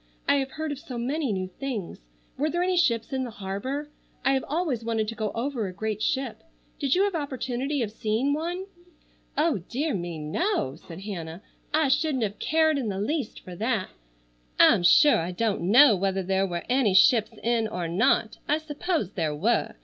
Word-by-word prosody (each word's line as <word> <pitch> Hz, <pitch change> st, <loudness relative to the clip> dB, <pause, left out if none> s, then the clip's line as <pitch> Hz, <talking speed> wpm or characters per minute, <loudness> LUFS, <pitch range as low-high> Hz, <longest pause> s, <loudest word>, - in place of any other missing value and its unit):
I -, -, +4 dB
have 270 Hz, -1 st, -2 dB
heard 315 Hz, -1 st, -3 dB
of 285 Hz, -, -5 dB
so 275 Hz, -6 st, -7 dB
many 270 Hz, +2 st, -1 dB
new 185 Hz, -2 st, -2 dB
things. 245 Hz, -10 st, -4 dB, 0.4 s
Were 300 Hz, +3 st, 0 dB
there 345 Hz, +2 st, 0 dB
any 370 Hz, 0 st, +1 dB
ships 255 Hz, -8 st, +1 dB
in 260 Hz, -1 st, 0 dB
the 250 Hz, -, -4 dB
harbor? 230 Hz, +9 st, -5 dB, 0.3 s
I 270 Hz, -, +5 dB
have 265 Hz, -, +1 dB
always 295 Hz, -7 st, -1 dB
wanted 225 Hz, -2 st, -1 dB
to -, -, -4 dB
go 215 Hz, -3 st, -2 dB
over 235 Hz, -3 st, -2 dB
a -, -, -5 dB
great 215 Hz, +2 st, -3 dB
ship. 265 Hz, -1 st, -1 dB, 0.4 s
Did 275 Hz, -2 st, +2 dB
you 380 Hz, -, +4 dB
have 405 Hz, -1 st, 0 dB
opportunity 275 Hz, -2 st, -2 dB
of 210 Hz, -, -4 dB
seeing 225 Hz, +6 st, 0 dB
one?" 345 Hz, +5 st, -3 dB, 0.7 s
"Oh, 300 Hz, -7 st, +2 dB
dear 290 Hz, +4 st, -1 dB
me. 175 Hz, -3 st, -4 dB
No!" 155 Hz, -, -1 dB
said 170 Hz, +2 st, -11 dB
Hannah. 175 Hz, -2 st, -6 dB, 0.3 s
"I 310 Hz, -1 st, +3 dB
shouldn't 270 Hz, -2 st, +1 dB
have 205 Hz, -1 st, -3 dB
cared 315 Hz, -2 st, +2 dB
in 235 Hz, -5 st, -2 dB
the 195 Hz, -1 st, -3 dB
least 270 Hz, +3 st, -2 dB
for 180 Hz, -, -9 dB
that. 220 Hz, -3 st, -1 dB, 0.7 s
I'm -, -, +7 dB
sure 285 Hz, -, +6 dB
I 165 Hz, +1 st, -2 dB
don't 190 Hz, -1 st, -1 dB
know 245 Hz, +1 st, +8 dB
whether 190 Hz, 0 st, -1 dB
there 190 Hz, +1 st, +1 dB
were 175 Hz, -2 st, -4 dB
any 245 Hz, -6 st, +2 dB
ships 225 Hz, 0 st, +6 dB
in 230 Hz, -1 st, +1 dB
or 180 Hz, -5 st, -3 dB
not. 215 Hz, +5 st, +1 dB
I 300 Hz, -, +3 dB
suppose 315 Hz, -, -2 dB
there 160 Hz, -6 st, -2 dB
were. 215 Hz, +11 st, 0 dB
240 Hz, 195 wpm, -26 LUFS, 195-290 Hz, 0.7 s, know